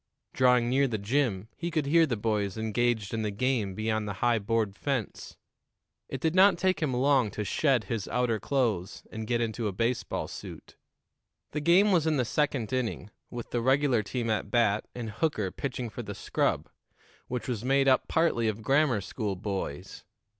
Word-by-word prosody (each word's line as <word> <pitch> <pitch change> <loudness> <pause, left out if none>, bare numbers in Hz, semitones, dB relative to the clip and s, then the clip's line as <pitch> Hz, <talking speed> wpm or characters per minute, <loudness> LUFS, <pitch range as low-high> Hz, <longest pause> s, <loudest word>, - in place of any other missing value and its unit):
Drawing 125 -2 +4
near 135 +3 +3
the 115 -4 -2
gym, 105 -2 0
he 170 - -3
could 155 -3 -1
hear 165 +3 +4
the 120 -5 -1
boys 105 -2 -1
engaged 110 -1 0
in 115 - -1
the 105 - -1
game 105 -2 -1
beyond 110 0 -1
the 100 - -3
high 120 -2 +3
board 110 -1 -1
fence. 135 -5 -4 0.7
It - - -4
did 160 0 0
not 190 0 +6
take 185 0 +1
him 150 -4 +1
long 130 -2 +3
to 105 +2 -4
shed 130 +2 +1
his 105 0 -3
outer 120 -3 0
clothes 110 -7 -1
and 110 0 -6
get 120 0 +1
into 115 -1 -2
a - - -1
baseball 115 +5 -1
suit. - - -10 0.8
The 150 - -3
game 185 +7 +5
was 165 -4 +3
in 155 -2 +2
the 125 - +1
second 135 -3 -1
inning, 115 -4 -2 0.2
with 120 -2 -7
the 120 - 0
regular 130 -1 +3
team 115 +3 -3
at 105 -1 -1
bat 110 -2 +2
and 115 -3 -5
Hooker 110 - -1
pitching 125 -3 -4
for - - -6
the - - -7
scrub, - - -1 0.6
which 125 -1 -4
was 120 -4 -3
made 135 +1 +3
up 130 - +3
partly 160 -9 +2
of 110 0 -3
grammar 135 -3 +3
school 100 0 -3
boys. 95 -7 -5
120 Hz, 185 wpm, -28 LUFS, 110-135 Hz, 0.8 s, not